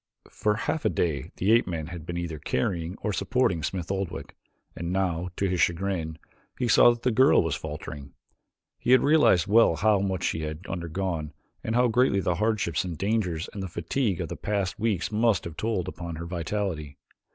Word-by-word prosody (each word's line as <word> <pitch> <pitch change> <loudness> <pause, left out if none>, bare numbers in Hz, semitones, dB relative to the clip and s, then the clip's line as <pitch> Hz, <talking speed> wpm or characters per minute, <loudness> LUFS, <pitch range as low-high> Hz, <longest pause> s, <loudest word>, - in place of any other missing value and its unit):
For 105 0 0
half 155 +7 -2
a - - +3
day 75 -6 -1
the 100 +4 +2
ape 115 +1 +4
man 80 -4 -3
had 85 0 -8
been 85 - -3
either 85 -3 -4
carrying 85 +6 -2
or 105 - 0
supporting 100 0 +1
Smith 90 +1 -3
Oldwick 95 -3 -4 0.4
and 85 +1 -4
now, 90 -2 0
to 100 - 0
his 90 -2 0
chagrin, 85 -3 0 0.4
he 125 - 0
saw 115 - +7
that 120 -1 -1
the 125 - +2
girl 130 0 +5
was 80 -3 -1
faltering. 75 -2 -7 0.6
He 125 - +3
had 130 - +6
realized 140 - +5
well 105 -3 +5
how 105 +2 +3
much 95 -2 -1
she 80 - -1
had 75 +3 -5
undergone 85 -3 -3 0.3
and 110 - -2
how 125 0 +4
greatly 120 -3 +3
the 90 -2 +1
hardships 100 -8 +1
and 90 -4 -5
dangers 95 -5 -1
and 100 - -5
the 95 - -3
fatigue 90 +5 -1
of - - -4
the - - -4
past 100 -2 -2
weeks 105 -5 0
must 110 -3 +2
have 85 -2 -7
told 110 -2 -1
upon 85 -2 -6
her 85 +2 -6
vitality. 85 -4 -3
95 Hz, 195 wpm, -27 LUFS, 85-105 Hz, 0.6 s, saw